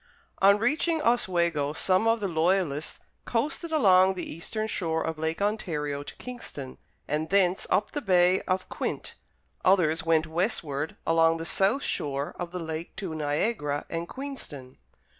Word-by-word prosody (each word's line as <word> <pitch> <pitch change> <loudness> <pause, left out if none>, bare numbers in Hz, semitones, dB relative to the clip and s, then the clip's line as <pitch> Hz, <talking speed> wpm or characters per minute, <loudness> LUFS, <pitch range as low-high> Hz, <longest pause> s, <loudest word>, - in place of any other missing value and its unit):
On 200 +1 +7
reaching 305 +8 +1
Oswego, 170 -10 +2
some 185 +6 +2
of 225 0 +2
the 200 - 0
Loyalists 165 -3 0 0.2
coasted 300 +7 -1
along 190 -10 +5
the 175 - -4
eastern 215 +7 -4
shore 165 -6 -1
of 160 -1 -3
Lake 160 +4 -1
Ontario 150 -9 -1
to 145 - -9
Kingston, 190 - -8 0.3
and 155 +2 -1
thence 190 -2 +2
up 205 +2 +1
the 295 - -3
Bay 180 -3 +4
of 185 0 0
Quinte; - - -4 0.5
others 165 -4 +3
went 160 -1 +3
westward 160 - -2
along 165 0 +4
the 165 - -5
south 195 - +2
shore 140 0 -2
of 175 -1 -3
the 180 - -4
lake 160 -1 -5
to 190 -5 -5
Niagara 150 0 -1
and 165 +1 -3
Queenston. 210 - -7
175 Hz, 150 wpm, -27 LUFS, 155-205 Hz, 0.5 s, On